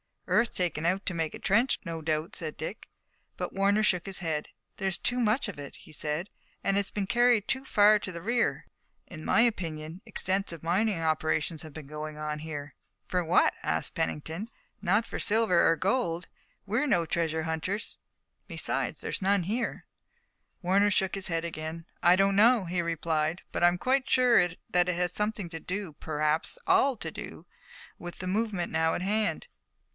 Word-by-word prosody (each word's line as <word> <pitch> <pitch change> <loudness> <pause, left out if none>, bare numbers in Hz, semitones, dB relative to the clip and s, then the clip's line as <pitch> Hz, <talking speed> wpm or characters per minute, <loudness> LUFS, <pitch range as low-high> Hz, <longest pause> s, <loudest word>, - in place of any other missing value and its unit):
"Earth 235 -1 +2
taken 170 -3 -1
out 185 +3 +1
to 185 - -1
make 165 -2 -2
a - - -9
trench, 235 +7 +3
no 165 -1 -4
doubt," 155 +4 -2
said 155 -4 -4
Dick. 160 +7 -6 0.5
But - - -4
Warner 200 +2 +3
shook 180 -4 +2
his 195 -1 -3
head. 160 -4 -2 0.3
"There's 190 -2 -1
too 245 +1 -1
much 230 +2 +2
of 185 - -8
it," 140 -1 -8
he - - -15
said, 155 +5 -3 0.3
"and 195 - +1
it's 200 -1 0
been 205 -2 -2
carried 240 0 +3
too 265 0 -1
far 210 -2 +5
to 185 - -4
the 170 -1 -7
rear. 235 +5 0 0.4
In 155 - -9
my - - +4
opinion 165 -7 -1
extensive 190 -6 -1
mining 185 +2 +1
operations 155 0 0
have 155 -2 -10
been 155 -1 -8
going 150 +1 -6
on 150 0 -3
here." 150 -2 -6 0.3
"For 180 -1 0
what?" 170 +2 +4
asked - - -1
Pennington. 160 +5 -3 0.3
"Not 205 +4 +2
for - - -5
silver 215 -5 +3
or 165 - +4
gold. 180 -3 0 0.4
We're 230 +9 0
no 170 -10 +3
treasure 160 -1 0
hunters, 160 +6 -3 0.5
and - - -46
besides, - - -3
there's - - -3
none 195 0 +3
here." 230 +7 -2 0.8
Warner 200 +3 +4
shook 190 -2 +1
his 195 -1 -3
head 165 -1 -1
again. 160 0 -5 0.2
"I 175 +1 +6
don't 195 +1 +3
know," 230 +1 +6
he 175 +1 -1
replied, 165 -1 -1
"but - - -2
I'm 175 +1 +5
quite 260 +6 +1
sure 245 -7 +5 0.2
that 180 0 +3
it 180 - +1
has 175 0 0
something 210 -2 -1
to 165 -1 -6
do, 185 -1 -4
perhaps 155 - 0
all 375 -8 +4
to - - -5
do, - - -8 0.5
with 175 0 -7
the 185 - -4
movement 200 -2 -1
now 160 0 +2
at - - -3
hand. 215 - 0
180 Hz, 180 wpm, -29 LUFS, 160-210 Hz, 0.8 s, I